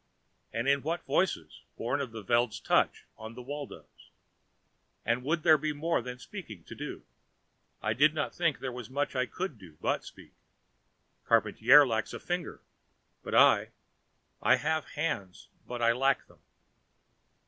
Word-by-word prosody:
And 115 +3 -2
in 140 0 +3
what 165 +4 -3
voices, 80 - -1 0.2
born 120 +5 -1
of 130 -4 -4
the 110 -1 -8
Veld's 120 +2 +1
touch - - +1
on 110 +1 -8
the 125 - -8
Waldos? 145 +2 -9 1.0
And 120 +2 +1
would 155 +3 0
there 155 -3 +6
be 155 +1 -1
more 160 0 0
than 125 +1 -7
speaking 125 - -9
to - - -10
do? - - -7 0.8
I 110 - +1
did 150 +6 +4
not 155 - -2
think 165 -4 +1
there 130 - -4
was 125 -1 -8
much 140 +2 -2
I 125 0 +1
could 180 - -5
do 85 -6 -15
but - - 0
speak. - - -14 1.0
Charpantier 145 +2 +6
lacks 110 -2 -1
a - - -5
finger, 175 -1 -4 0.6
but - - -4
I... - - +6 0.7
I - - +5
have 160 +1 -1
hands, 125 - -4 0.2
but 120 -1 -4
I 115 - +5
lack 135 +3 +1
them. - - -22
135 Hz, 160 wpm, -30 LUFS, 115-155 Hz, 1.0 s, there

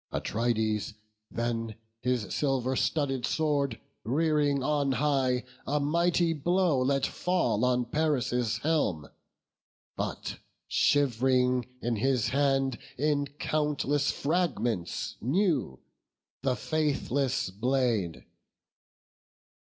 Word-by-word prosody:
Atrides 110 -2 -1 0.3
then 115 -2 -2 0.3
his 125 -4 -1
silver 130 -2 0
studded 135 -3 0
sword 145 -6 0 0.2
Rearing 145 +1 +1
on 145 -1 +1
high, 130 -2 +1 0.2
a 150 +2 +1
mighty 170 +3 +2
blow 175 -1 +2
let 135 +1 +2
fall 170 - 0
On 125 -1 +2
Paris' 125 -7 0
helm; 125 - 0 0.9
but - - -4 0.3
shiv'ring 125 -2 +2 0.2
in 120 -1 0
his 125 0 +1
hand 135 -2 +1 0.2
In 145 +1 +1
countless 145 -2 0
fragments 125 - -1
new 145 - +1 0.6
the 130 -1 +1
faithless 140 -6 0
blade. 115 -5 0
135 Hz, 90 wpm, -29 LUFS, 120-150 Hz, 0.9 s, mighty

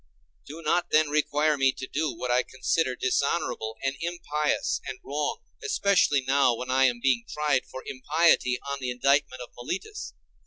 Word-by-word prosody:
Do 160 +3 -9
not 170 +3 +1
then 155 -1 +3
require 150 0 +1
me 135 0 +4
to 130 - -6
do 150 +3 -1
what 125 - -4
I 125 +1 +4
consider 130 +1 -1
dishonorable 130 -4 -1
and 135 0 0
impious 150 -3 -1
and - - -5
wrong, 395 - -2 0.2
especially 200 - +3
now, 135 -3 +4
when 125 +2 -5
I 135 +1 +4
am 120 -2 +1
being 125 -2 +2
tried 150 -3 0
for 130 - -8
impiety 140 -1 +2
on 140 0 -3
the 130 -2 -3
indictment 130 0 +1
of 120 - -12
Meletus. 195 - -5
140 Hz, 165 wpm, -27 LUFS, 130-155 Hz, 0.2 s, me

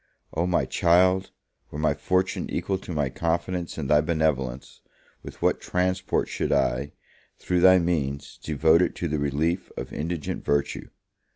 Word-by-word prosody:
O 85 +3 0
my 90 - +1
child, 90 +2 +3 0.4
were - - -7
my 75 -1 +2
fortune 90 +5 -1
equal 95 -1 -2
to 90 - -9
my 75 -4 0
confidence 85 +4 -2
in 80 - -3
thy 75 +2 +4
benevolence, 75 -5 -1 0.4
with - - -11
what - - +2
transport 90 +1 0
should - - -2
I, 70 +4 +1 0.4
through 90 -1 0
thy 95 +1 +7
means, 75 -5 -2
devote 80 +2 +3
it 90 - 0
to 85 - -2
the 75 -1 -1
relief 80 +6 -1
of - - -6
indigent 80 0 -4
virtue! 70 -1 -1
80 Hz, 155 wpm, -25 LUFS, 75-90 Hz, 0.4 s, thy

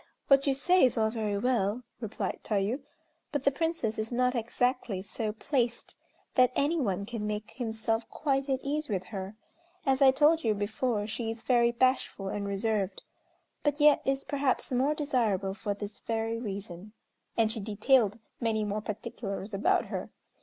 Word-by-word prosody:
what 275 0 +5
you 275 - +4
say 360 +7 +4
is 255 -3 +4
all 220 -1 +2
very 215 -3 -1
well," 235 0 +1 0.2
replied 215 -3 -3
Tayû, 210 +5 0 0.5
"but 290 -3 -1
the 280 - +4
Princess 280 -7 -1
is 220 +2 -3
not 250 +1 +2
exactly 240 -4 -1
so 215 +2 -3
placed 240 +1 -1 0.4
that 255 -1 +5
any 310 +4 +2
one 200 -7 -1
can 220 -1 -4
make 210 0 -4
himself 225 -1 -2
quite 275 -2 -1
at 265 -1 +1
ease 295 +1 -2
with 190 -3 -1
her. 195 +1 -6 0.5
As 270 0 +2
I 270 - +9
told 300 +4 +4
you 220 -2 +2
before 210 +1 -1
she 225 +1 -3
is 225 0 -6
very 235 -2 +4
bashful 240 -5 +1
and 200 0 -3
reserved; 200 0 -1 0.6
but 295 0 0
yet 295 0 +6
is 270 0 0
perhaps 275 -3 0
more 265 +4 +2
desirable 225 -10 0
for 205 0 -3
this 205 +1 -7
very 225 0 -2
reason," 200 -2 -6 0.4
and 225 -1 +4
she 225 - -1
detailed 215 +1 +2 0.2
many 220 -2 0
more 210 +1 -2
particulars 210 -1 -5
about 195 - +2
her. - - -5
225 Hz, 165 wpm, -30 LUFS, 210-265 Hz, 0.6 s, I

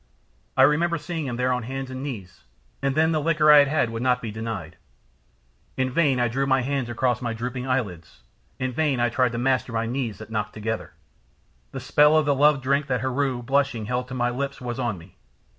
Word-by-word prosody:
I 130 - +7
remember 165 +4 +3
seeing 160 -1 -4
him 120 - -3
there 125 +1 +1
on 125 - -1
hands 135 +2 -5
and 130 0 -6
knees, 105 - -7 0.4
and 140 -1 0
then 160 +1 +3
the 155 -1 +1
liquor 155 -1 +4
I 150 - +9
had 140 - +5
had 135 -5 +1
would 115 0 -4
not 125 0 +2
be 115 -3 -5
denied. 110 -6 -6 1.0
In 130 0 0
vain 140 -3 +2
I 120 - +2
drew 135 +4 -1
my 135 -1 +3
hands 135 -1 -2
across 125 0 0
my 120 -2 -2
drooping 125 +2 -4
eyelids, 100 - -3 0.3
in 130 0 -2
vain 140 -1 0
I 120 0 +2
tried 125 0 +1
to - - -3
master 130 0 0
my 115 0 0
knees 120 -4 -3
that 110 +1 -11
knocked 105 -1 -2
together. 110 +1 -4 0.8
The 135 - -5
spell 150 +4 +4
of 155 - +3
the 145 - +3
love 145 0 +3
drink 140 +2 +1
that 125 -3 -1
Heru, 130 -1 -1
blushing, 135 -3 0
had - - -9
held 125 0 -1
to 130 - -7
my 120 -1 0
lips 140 +2 -4
was 125 0 -5
on 120 -6 -1
me. 90 +2 -16
130 Hz, 225 wpm, -24 LUFS, 115-140 Hz, 1.0 s, I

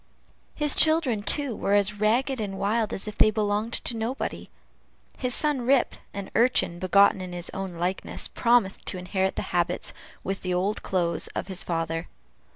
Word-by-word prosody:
His 295 -2 +2
children, 315 -9 +4
too, 255 +4 +2
were 200 - 0
as 205 0 +2
ragged 240 +4 +1
and 195 -2 -4
wild 215 +2 0
as 195 - -3
if 210 - -7
they - - +6
belonged 215 +1 -1
to 235 - +2
nobody. 230 +4 -4 0.7
His 250 -2 +1
son 295 -4 +1
Rip, 260 +1 +2 0.2
an 200 -1 -7
urchin 230 -7 +2
begotten 195 +1 +4
in 180 -1 -7
his 175 0 -4
own 190 -1 -5
likeness, 175 +3 -3
promised 235 -5 +1
to 185 - -1
inherit 190 +1 -1
the - - -3
habits, - - -1 0.3
with 195 0 -3
the 180 -1 -2
old 195 +4 -1
clothes, 175 -3 -1
of - - -4
his 190 +2 -1
father. 165 -2 -3
205 Hz, 170 wpm, -26 LUFS, 190-235 Hz, 0.7 s, they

